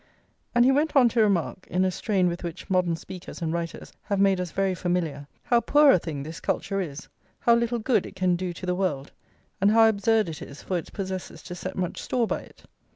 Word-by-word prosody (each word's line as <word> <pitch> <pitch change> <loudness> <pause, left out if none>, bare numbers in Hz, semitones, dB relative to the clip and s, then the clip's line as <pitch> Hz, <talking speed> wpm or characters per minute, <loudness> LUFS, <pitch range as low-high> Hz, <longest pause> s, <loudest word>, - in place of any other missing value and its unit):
And 240 0 +6
he 265 - +6
went 295 +3 +1
on 255 -4 +6
to 230 0 +2
remark, 190 -3 0
in 185 +1 +1
a 185 - +1
strain 190 -1 +1
with 175 +1 -3
which 170 +2 -7
modern 180 -2 +2
speakers 180 +2 -9
and 165 -2 -2
writers 170 -1 -5
have 200 -2 -1
made 195 -2 +3
us 180 - -3
very 195 +2 0
familiar, 170 -6 -2 0.2
how 240 -2 +3
poor 290 +2 +6
a 185 - +4
thing 150 -4 -5
this 160 +3 -7
culture 195 -1 -1
is, 150 -4 -6 0.3
how 235 - +5
little 235 0 +1
good 235 +2 +1
it - - -12
can 185 -1 +2
do 180 0 -3
to 175 - -8
the 180 - 0
world, 155 -7 -2 0.5
and 200 - +5
how 225 +1 +6
absurd 220 0 +2
it 160 -3 -6
is 140 - -10
for 185 - -2
its - - -10
possessors 190 -4 -6
to 180 - -7
set 185 +1 -6
much 180 -2 -3
store 245 -2 0
by - - -2
it. - - -16
185 Hz, 230 wpm, -26 LUFS, 170-220 Hz, 0.5 s, And